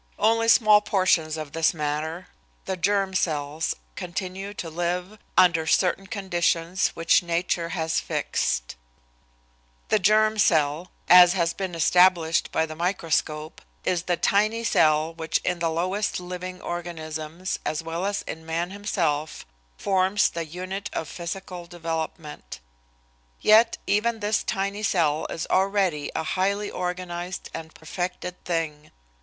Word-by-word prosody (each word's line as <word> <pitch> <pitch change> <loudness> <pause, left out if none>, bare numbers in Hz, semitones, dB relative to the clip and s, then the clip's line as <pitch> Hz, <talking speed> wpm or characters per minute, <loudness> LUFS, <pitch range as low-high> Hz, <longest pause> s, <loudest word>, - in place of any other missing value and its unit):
Only 230 +1 +3
small 215 -2 +6
portions 170 -6 +1
of 155 -2 -6
this 165 +2 +1
matter, 155 +3 -3 0.4
the 190 - -2
germ 195 +1 +1
cells, 155 -3 -1 0.2
continue 190 +2 -5
to 170 - -5
live 180 +5 -3 0.2
under 165 -3 +5
certain 190 +3 +2
conditions 175 -2 0
which 165 0 +4
nature 170 0 -1
has 160 -1 0
fixed. - - -2 1.1
The 215 - +3
germ 215 +2 +3
cell 160 -2 +2 0.2
as 180 0 +9
has 170 -3 +1
been 190 -3 -4
established 170 -1 +3
by 160 - +1
the 155 - -7
microscope 160 -3 -1 0.2
is 175 -2 +1
the 175 0 -1
tiny 215 +3 +2
cell 155 -6 +3
which 165 0 -1
in 180 -1 -1
the 170 -1 +1
lowest 185 +6 -1
living 180 0 -6
organisms 165 0 -5
as 155 +1 -2
well 165 +2 -4
as 200 +1 -1
in 160 - -7
man 165 +2 -2
himself, 160 -7 -2 0.3
forms 190 +1 +2
the 170 -1 -4
unit 185 +5 -5
of 160 - -3
physical 175 0 -6
development. 165 -3 -5 0.8
Yet 225 +2 +5
even 225 +3 +1
this 210 0 +1
tiny 200 0 -2
cell 165 -7 +1
is 165 - -4
already 190 -6 +1
a 160 - -1
highly 200 +5 -1
organized 180 0 -4
and 160 -1 -8
perfected 180 +2 -5
thing. 160 -3 -3
175 Hz, 130 wpm, -25 LUFS, 160-195 Hz, 1.1 s, as